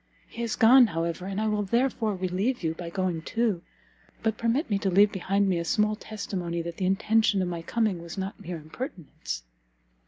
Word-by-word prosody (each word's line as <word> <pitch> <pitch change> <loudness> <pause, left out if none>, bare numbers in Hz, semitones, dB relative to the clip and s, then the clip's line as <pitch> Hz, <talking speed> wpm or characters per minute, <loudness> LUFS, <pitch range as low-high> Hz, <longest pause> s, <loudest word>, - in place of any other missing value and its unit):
He 235 - -8
is 230 -2 -1
gone, 245 +2 +7
however, 170 0 -3
and 195 +1 -3
I 220 - +1
will 210 -1 +1
therefore 225 0 +1
relieve 190 +6 -1
you 160 -1 0
by 170 +1 -7
going 180 -2 -1
too: 220 -1 0 0.6
but 220 -1 +1
permit 235 +8 0
me 200 -2 0
to 195 - 0
leave 200 +3 +5
behind 195 0 +1
me 180 -3 +1
a - - -1
small 210 +5 +2
testimony 180 -6 -4
that 170 0 -6
the 185 - 0
intention 215 +1 +3
of 185 - 0
my 170 -1 -3
coming 205 -1 0
was 170 +1 -8
not 195 +3 -4
mere 180 -4 -5
impertinence." 155 - -6
195 Hz, 195 wpm, -27 LUFS, 175-220 Hz, 0.6 s, gone